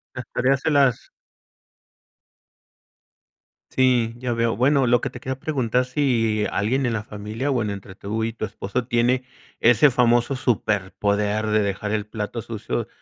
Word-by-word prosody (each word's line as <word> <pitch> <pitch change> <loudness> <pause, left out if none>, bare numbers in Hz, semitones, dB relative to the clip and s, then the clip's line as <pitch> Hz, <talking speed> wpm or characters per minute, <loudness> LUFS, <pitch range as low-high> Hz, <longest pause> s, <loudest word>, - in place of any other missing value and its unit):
Las - - -5
tareas 135 +1 +2
se 160 - 0
las 135 -4 +2 2.6
Sí, 125 -3 +2
ya 125 0 -2
veo. 115 -1 0
Bueno, 135 +2 +3
lo 120 0 +3
que - - -2
te 125 - -10
quería 130 +1 -5
preguntar 130 -4 0
si, 115 -6 +1
alguien 130 +7 0
en 120 - 0
la 105 -2 -2
familia, 105 +6 -5
bueno, 110 -6 0
entre 95 -1 -10
tú 105 +3 -3
y 115 - -1
tu 115 - -4
esposo, 105 +4 -4
tiene 120 +2 +2 0.4
ese 120 +5 +5
famoso 120 +1 +2
superpoder 105 -3 0
de 110 0 +2
dejar 100 +1 -2
el 105 -1 -1
plato 110 +2 -5
sucio, 115 0 -4
115 Hz, 150 wpm, -23 LUFS, 105-130 Hz, 2.6 s, ese